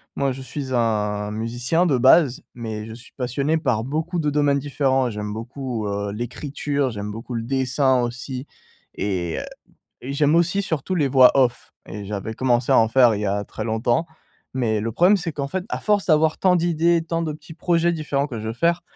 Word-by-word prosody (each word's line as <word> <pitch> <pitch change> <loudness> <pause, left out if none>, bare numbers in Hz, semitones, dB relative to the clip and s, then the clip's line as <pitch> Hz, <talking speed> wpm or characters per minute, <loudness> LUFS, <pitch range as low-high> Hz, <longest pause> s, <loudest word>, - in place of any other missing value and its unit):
Moi 140 -1 0
je 135 +1 -6
suis 130 0 -5
un 105 -3 0
musicien 120 +10 0
de 140 -7 +2
base, 130 +1 +5
mais 110 -3 -5
je 110 - -8
suis 120 +1 -14
passionné 140 +5 -1
par 115 -8 0
beaucoup 160 +7 -2
de 150 -2 +1
domaines 145 -1 +2
différents. 135 -2 +1
J'aime 105 -1 -5
beaucoup, 120 0 -5
heu, 100 0 -3
l'écriture, 140 +4 -2
j'aime 105 -2 -5
beaucoup 115 +3 -7
le 115 -1 -2
dessin 130 0 +1
aussi 125 +3 -5 0.5
et 90 -4 -2
heu, - - -5 0.6
et 135 - -5
j'aime 150 +2 +3
aussi 175 +4 +2
surtout 175 -1 -2
les 150 -4 +2
voix 130 -1 +7
off 125 -3 +1
et 105 +1 -7
j'avais 105 +2 -4
commencé 125 -1 +1
à - - +6
en 115 - +4
faire 120 -1 +5
il 105 - -3
y 105 - -1
a 100 +1 -1
très 110 - -7
longtemps. 115 +7 0 0.5
Mais 115 -4 +1
le 115 +2 -3
problème 180 - +5
c'est 175 -3 -3
qu'en 140 -1 -4
fait 185 +5 -3
à - - -3
force 210 -2 +1
d'avoir 155 -1 +3
tant 185 -1 +4
d'idées, 170 -1 +2
tant 165 0 -2
de 155 -2 -2
petits 155 +2 -12
projets 170 0 +1
différents 150 -3 -1
que 120 -5 -5
je 110 - -6
veux 110 - -2
faire, 170 +7 +1
130 Hz, 205 wpm, -22 LUFS, 115-155 Hz, 0.6 s, voix